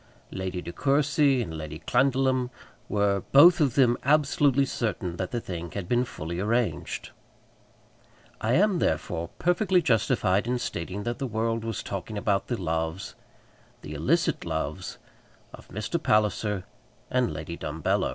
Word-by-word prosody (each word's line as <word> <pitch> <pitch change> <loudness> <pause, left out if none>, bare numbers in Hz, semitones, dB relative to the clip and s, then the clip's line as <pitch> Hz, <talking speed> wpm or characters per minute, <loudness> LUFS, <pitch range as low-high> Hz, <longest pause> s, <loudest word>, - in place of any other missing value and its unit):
Lady 95 -1 -4
De 85 - -7
Courcy 140 - +2
and 80 -6 -6
Lady 75 -1 -6
Clandidlem 130 +2 +1 0.4
were, 100 -1 +1
both 170 +5 +8
of 140 -4 +2
them, 125 -3 +5
absolutely 140 -1 +3
certain 95 -9 -3
that 95 0 -3
the 120 - -2
thing 85 -5 -6
had 100 -4 -4
been 120 +3 +2
fully 85 -6 -6
arranged. 115 +4 -1 1.3
I 110 +2 +1
am, 195 +2 +3
therefore, 80 - -1
perfectly 180 +1 +2
justified 110 - +2
in 125 +1 +1
stating 95 -3 -4
that 120 +1 -3
the 135 - -2
world 115 0 -1
was 115 -2 -4
talking 100 +2 -5
about 100 -1 0
the 120 - -2
loves, 80 +1 -2 0.7
the - - -7
illicit - - +1
loves, - - -4 0.6
of - - -12
Mr. - - -3
Palliser 105 -2 +1 0.5
and 125 -2 +2
Lady 85 - -6
Dumbello. 80 -1 -1
115 Hz, 140 wpm, -27 LUFS, 90-130 Hz, 1.3 s, both